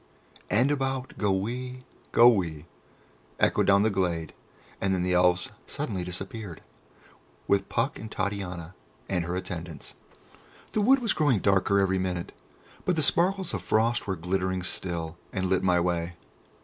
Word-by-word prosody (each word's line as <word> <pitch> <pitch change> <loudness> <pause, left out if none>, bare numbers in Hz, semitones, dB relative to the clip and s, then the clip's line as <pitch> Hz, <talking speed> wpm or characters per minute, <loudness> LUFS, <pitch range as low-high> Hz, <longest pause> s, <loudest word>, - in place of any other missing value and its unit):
"And 125 +7 +3
about 135 -2 -1
goe 105 -2 +2
wee, 125 +6 -3 0.3
goe 120 - +8
wee!" 85 -9 +2 0.7
echoed - - +3
down 100 +1 +5
the 110 - +2
glade, 85 -5 -1 0.5
and 95 -1 +2
then 90 - 0
the 90 0 +1
Elves 90 +1 +3 0.2
suddenly 95 -2 -3
disappeared, 95 0 -6 0.8
with 100 -1 +2
Puck 140 - 0
and 110 - -7
Titania 95 -4 -3 0.3
and 90 -3 0
her 85 +1 -3
attendants. 85 -3 -6 0.8
The 215 - +1
wood 260 +6 +6
was 230 - +2
growing 145 -7 +3
darker 100 0 +3
every 95 -1 +2
minute, 90 -2 -2 0.5
but 180 - +1
the 155 - +2
sparkles 185 +4 +2
of - - -2
frost 115 +2 +1
were 95 - 0
glittering 95 +1 -1
still, 85 -2 -3
and 95 -1 -1
lit 95 0 +2
my 90 -2 +3
way. 85 0 -1
95 Hz, 150 wpm, -27 LUFS, 90-115 Hz, 0.8 s, goe